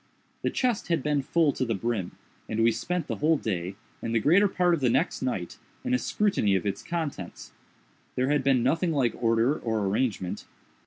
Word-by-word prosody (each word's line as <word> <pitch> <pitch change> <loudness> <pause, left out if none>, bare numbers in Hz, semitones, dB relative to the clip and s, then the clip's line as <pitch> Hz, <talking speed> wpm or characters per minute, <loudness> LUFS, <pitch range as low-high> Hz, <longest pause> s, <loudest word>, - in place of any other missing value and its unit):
The - - 0
chest 245 -5 0
had 165 -6 0
been 150 -1 +1
full 155 +1 +2
to - - -2
the 115 -3 -1
brim, 105 -3 -2 0.4
and 110 +1 0
we 115 - +5
spent 175 +10 -2
the - - -4
whole 155 +2 +3
day, 95 -6 -3 0.3
and 115 0 -2
the - - +4
greater 180 - +5
part 180 -2 +2
of 170 - +1
the 130 -3 +2
next 135 +9 +1
night, 110 -9 -3 0.2
in - - -1
a 125 - +3
scrutiny 160 - +1
of 95 - -1
its 100 0 -2
contents. 160 - -5 0.6
There 130 +1 +1
had 145 -2 +2
been 130 -3 +3
nothing 165 +6 +1
like 130 -6 +1
order 115 +4 +3
or 110 -3 -1
arrangement. 100 -2 -1
130 Hz, 200 wpm, -27 LUFS, 110-160 Hz, 0.6 s, we